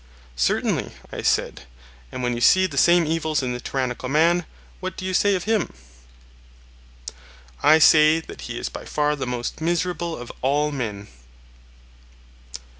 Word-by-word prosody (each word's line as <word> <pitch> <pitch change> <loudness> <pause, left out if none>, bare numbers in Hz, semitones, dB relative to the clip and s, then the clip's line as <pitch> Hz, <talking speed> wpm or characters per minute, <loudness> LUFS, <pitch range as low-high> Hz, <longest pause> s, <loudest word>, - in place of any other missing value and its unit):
Certainly, - - 0 0.2
I - - -4
said. - - -1 0.5
And 125 - -5
when 120 0 0
you 120 - -4
see 185 +9 +5
the 165 -6 -5
same 170 +4 +4
evils 155 -2 -1
in 125 -1 -2
the 125 - -5
tyrannical 125 0 -3
man, 165 +4 +2 0.3
what 185 0 -6
do 185 - -6
you 185 - -2
say 200 +2 +3
of 180 - -3
him? 220 -1 0 1.9
I 155 +2 +6
say 155 0 +6
that 160 - -11
he 120 -1 -6
is - - -3
by - - -8
far 150 0 0
the 135 - -5
most 125 +4 -4
miserable 170 0 -1
of 120 0 -8
all 145 +3 +1
men. 105 -7 -5
150 Hz, 155 wpm, -23 LUFS, 125-170 Hz, 1.9 s, I